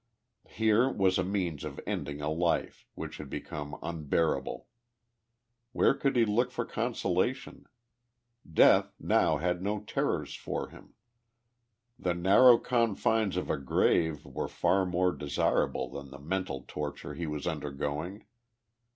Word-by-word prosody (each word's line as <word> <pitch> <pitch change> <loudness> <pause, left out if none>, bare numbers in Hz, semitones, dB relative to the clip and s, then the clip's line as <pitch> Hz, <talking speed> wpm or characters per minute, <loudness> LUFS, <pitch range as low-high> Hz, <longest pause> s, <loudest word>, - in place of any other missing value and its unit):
Here 110 +3 +3
was 95 -4 +2
a - - +2
means 90 -6 -2
of - - -6
ending 70 +1 -4
a 75 - -2
life, 85 +1 -1
which - - -6
had - - -8
become 75 -1 -6
unbearable. 80 0 -1 1.1
Where - - +4
could 140 -1 0
he 120 -2 +5
look 120 +4 +1
for 120 -1 -3
consola 110 -3 0
tion? 135 - -13 0.9
Death - - +5
now 80 - +2
had 90 +3 -1
no 105 +1 -2
terrors 105 - -2
for - - -4
him! - - -16 1.0
The 90 -1 0
narrow 105 +8 +7
confines 115 -4 +1
of 90 - -1
a - - -1
grave 75 +3 +1
were - - -4
far 95 -1 +1
more 90 0 +2
desirable 70 -4 0
than 70 -1 -8
the 70 - -10
mental 80 -1 -3
torture 75 -1 -5
lie 85 -1 -4
was 75 -1 -4
undergoing. 75 +4 -4
90 Hz, 135 wpm, -30 LUFS, 75-105 Hz, 1.1 s, narrow